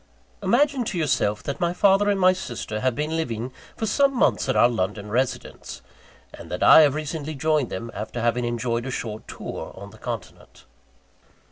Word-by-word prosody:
Imagine 255 Hz, +6 st, +2 dB
to 190 Hz, -, -3 dB
yourself 130 Hz, -9 st, 0 dB
that 140 Hz, -, -4 dB
my 175 Hz, -1 st, +1 dB
father 200 Hz, +2 st, +4 dB
and 200 Hz, -1 st, +1 dB
my 185 Hz, 0 st, +5 dB
sister 120 Hz, -10 st, -5 dB
have 130 Hz, 0 st, 0 dB
been 150 Hz, +2 st, -2 dB
living 125 Hz, -5 st, -3 dB, 0.2 s
for 225 Hz, -, -2 dB
some 275 Hz, +5 st, +2 dB
months 140 Hz, -, +2 dB
at 130 Hz, -, +1 dB
our -, -, +6 dB
London 105 Hz, -2 st, -3 dB
residence; 125 Hz, +3 st, -3 dB, 0.5 s
and -, -, -11 dB
that -, -, -2 dB
I -, -, +9 dB
have 145 Hz, -2 st, +4 dB
recently 155 Hz, 0 st, -4 dB
joined 150 Hz, -2 st, +1 dB
them, 115 Hz, +5 st, -5 dB
after 110 Hz, +3 st, -5 dB
having 120 Hz, +1 st, +1 dB
enjoyed 120 Hz, 0 st, -2 dB
a -, -, -3 dB
short 110 Hz, -4 st, -5 dB
tour -, -, -7 dB
on 100 Hz, 0 st, -9 dB
the 110 Hz, -, -16 dB
continent. 115 Hz, -7 st, -8 dB
130 Hz, 180 wpm, -24 LUFS, 115-175 Hz, 0.5 s, I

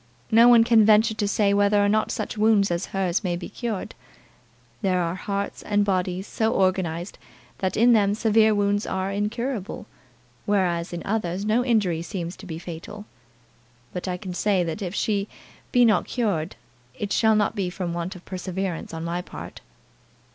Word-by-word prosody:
No 230 Hz, +2 st, +7 dB
one 240 Hz, -2 st, +7 dB
can 230 Hz, -1 st, +5 dB
venture 220 Hz, +1 st, +5 dB
to 215 Hz, -1 st, -1 dB
say 200 Hz, -1 st, +2 dB
whether 205 Hz, +1 st, +3 dB
or 205 Hz, -, +3 dB
not 215 Hz, +1 st, +1 dB
such 215 Hz, -, -3 dB
wounds 210 Hz, -3 st, +3 dB
as 170 Hz, 0 st, -2 dB
hers 190 Hz, 0 st, -1 dB
may 175 Hz, -2 st, -1 dB
be 175 Hz, -, -7 dB
cured. 225 Hz, -6 st, -4 dB, 0.9 s
There 185 Hz, -3 st, +1 dB
are 170 Hz, -1 st, -1 dB
hearts 200 Hz, +1 st, -4 dB
and 205 Hz, -1 st, +1 dB
bodies 185 Hz, -1 st, -1 dB
so 220 Hz, +1 st, 0 dB
organized, 185 Hz, -2 st, -1 dB, 0.4 s
that 190 Hz, -1 st, -1 dB
in 240 Hz, +2 st, +5 dB
them 205 Hz, -2 st, +3 dB
severe 220 Hz, -1 st, +3 dB
wounds 205 Hz, 0 st, +1 dB
are 190 Hz, +1 st, -2 dB
incurable, 210 Hz, +2 st, -3 dB, 0.6 s
whereas 180 Hz, -4 st, +1 dB
in 175 Hz, -1 st, -5 dB
others 195 Hz, -2 st, -2 dB
no 220 Hz, +3 st, +2 dB
injury 205 Hz, -9 st, +1 dB
seems 175 Hz, 0 st, -5 dB
to 195 Hz, -, -11 dB
be 160 Hz, -2 st, -5 dB
fatal. 175 Hz, +5 st, -8 dB, 0.9 s
But 180 Hz, +1 st, -5 dB
I 180 Hz, -1 st, -2 dB
can 180 Hz, 0 st, -7 dB
say 190 Hz, 0 st, +1 dB
that 165 Hz, +4 st, -4 dB
if 185 Hz, 0 st, -4 dB
she 205 Hz, -2 st, 0 dB, 0.4 s
be 245 Hz, -1 st, +5 dB
not 215 Hz, -2 st, +3 dB
cured 195 Hz, -9 st, -1 dB, 0.4 s
it 205 Hz, -1 st, -3 dB
shall 220 Hz, -1 st, +4 dB
not 210 Hz, 0 st, +1 dB
be 195 Hz, -4 st, -1 dB
from 180 Hz, -1 st, -4 dB
want 175 Hz, +2 st, -4 dB
of 180 Hz, -, -13 dB
perseverance 185 Hz, -2 st, -4 dB
on 160 Hz, -, -5 dB
my 170 Hz, +1 st, -2 dB
part." -, -, -10 dB
200 Hz, 175 wpm, -24 LUFS, 180-215 Hz, 0.9 s, No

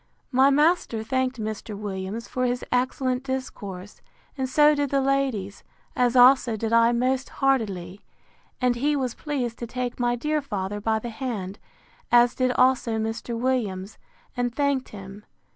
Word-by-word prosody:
] -, -, -43 dB
My 265 Hz, +1 st, +5 dB
master 295 Hz, -6 st, +2 dB
thanked 260 Hz, +2 st, -1 dB
Mr. 215 Hz, -1 st, -5 dB
Williams 200 Hz, +2 st, -5 dB
for 255 Hz, 0 st, -1 dB
his 245 Hz, 0 st, -2 dB
excellent 255 Hz, 0 st, 0 dB
discourse, 205 Hz, -8 st, -6 dB, 0.3 s
and 265 Hz, -2 st, -2 dB
so 295 Hz, +2 st, +5 dB
did 285 Hz, -1 st, -1 dB
the 275 Hz, -, +2 dB
ladies; 265 Hz, -8 st, -1 dB, 0.3 s
as 245 Hz, 0 st, +2 dB
also 245 Hz, -2 st, +6 dB
did 225 Hz, +1 st, -2 dB
I 230 Hz, 0 st, +5 dB
most 255 Hz, +2 st, 0 dB
heartily: 205 Hz, -9 st, -1 dB, 0.6 s
and 250 Hz, -1 st, +2 dB
he 290 Hz, +4 st, +1 dB
was 255 Hz, -4 st, -1 dB
pleased 255 Hz, -6 st, -4 dB
to 235 Hz, -, -5 dB
take 250 Hz, +1 st, -4 dB
my 240 Hz, 0 st, +1 dB
dear 300 Hz, +5 st, -1 dB
father 205 Hz, -6 st, -4 dB
by 220 Hz, +1 st, +1 dB
the 235 Hz, +2 st, -5 dB
hand, 220 Hz, -6 st, -5 dB, 0.5 s
as 240 Hz, 0 st, +5 dB
did 255 Hz, -1 st, +1 dB
also 250 Hz, -3 st, +2 dB
Mr. 225 Hz, +1 st, -3 dB
Williams, 220 Hz, -6 st, -2 dB, 0.4 s
and 245 Hz, -1 st, -2 dB
thanked 280 Hz, -2 st, 0 dB
him. 200 Hz, 0 st, -10 dB
245 Hz, 160 wpm, -25 LUFS, 220-265 Hz, 0.6 s, also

